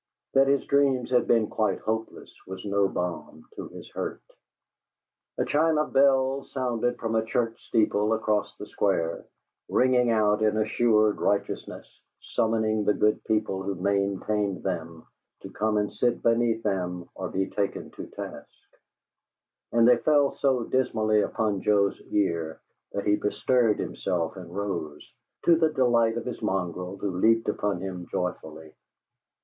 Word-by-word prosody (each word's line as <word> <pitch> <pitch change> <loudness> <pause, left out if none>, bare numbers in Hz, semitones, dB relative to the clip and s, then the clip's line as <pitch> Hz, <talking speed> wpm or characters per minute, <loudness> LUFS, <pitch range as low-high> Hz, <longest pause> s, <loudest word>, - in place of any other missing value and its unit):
That 135 0 +5
his 140 0 +2
dreams 135 -3 +2
had 125 - +3
been 115 -2 +4
quite 110 0 0
hopeless 110 +1 -4
was 95 +1 -7
no 100 -1 +2
balm 80 -4 -5
to - - -6
his - - -11
hurt. - - -5 1.1
A - - 0
chime 160 +1 +2
of 150 0 -1
bells 135 0 +3
sounded 120 -2 -1
from 115 -1 -3
a 110 0 +2
church 115 0 -2
steeple 105 -1 +2
across 110 -2 -1
the - - -7
Square, 85 -6 -1 0.4
ringing 125 -1 +3
out 105 -1 +2
in 110 0 +2
assured 110 -1 +2
righteousness, 100 -1 -2 0.3
summoning 110 -1 0
the 105 - +2
good 105 0 +1
people 105 -3 0
who 95 +1 -3
maintained 100 +1 -1
them 85 -3 -4 0.4
to - - -9
come 110 +1 0
and 105 0 -1
sit 120 -1 0
beneath 115 -1 +2
them 90 -3 -2
or - - -5
be 95 0 -2
taken 100 -1 -3
to - - -9
task; - - -8 1.2
and 115 0 +4
they 125 -1 +6
fell 145 +2 +3
so 130 -3 +1
dismally 110 -4 +1
upon 105 -3 -1
Joe's 100 -2 +2
ear 85 -5 -1 0.3
that 100 - -3
he 105 0 +3
bestirred 115 +2 +1
himself 85 -4 -2
and 90 -3 -9
rose, 85 -6 -5 0.3
to 170 - +6
the 160 -1 +3
delight 120 -5 +2
of 120 - -4
his 125 - -5
mongrel, 90 0 -2
who 95 -2 -3
leaped 115 +2 +3
upon 105 -3 -1
him 90 -2 -6
joyfully. 80 -3 -5
105 Hz, 150 wpm, -26 LUFS, 95-120 Hz, 1.2 s, they